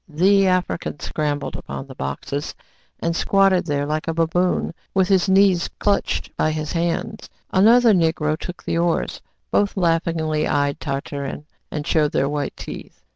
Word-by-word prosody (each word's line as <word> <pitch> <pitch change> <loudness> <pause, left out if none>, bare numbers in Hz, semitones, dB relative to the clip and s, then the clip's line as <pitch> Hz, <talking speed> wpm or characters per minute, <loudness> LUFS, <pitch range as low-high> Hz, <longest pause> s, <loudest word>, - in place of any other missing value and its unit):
The 195 +5 +4
African 180 -5 -1
scrambled 145 -2 -2
upon - - -6
the 135 - -11
boxes, 130 - -4 0.5
and 170 0 0
squatted 195 -1 +3
there 145 -1 0
like 155 +2 -2
a 165 - -1
baboon, 170 +2 +1 0.2
with 190 -1 +3
his 190 0 +3
knees 190 -2 +4
clutched 205 -1 0
by 155 - +1
his 155 -1 -3
hands. 175 +6 -2 0.2
Another 225 +4 +6
Negro 160 -3 +1
took 180 +3 -8
the 165 - -1
oars. 170 -1 0 0.3
Both 205 0 +1
laughingly 165 -3 +1
eyed 145 -1 0
Tartarin, 140 0 -4 0.2
and 150 -1 -4
showed 150 -2 +1
their 140 - +2
white 145 -1 -3
teeth. - - -9
165 Hz, 150 wpm, -22 LUFS, 150-185 Hz, 0.5 s, Another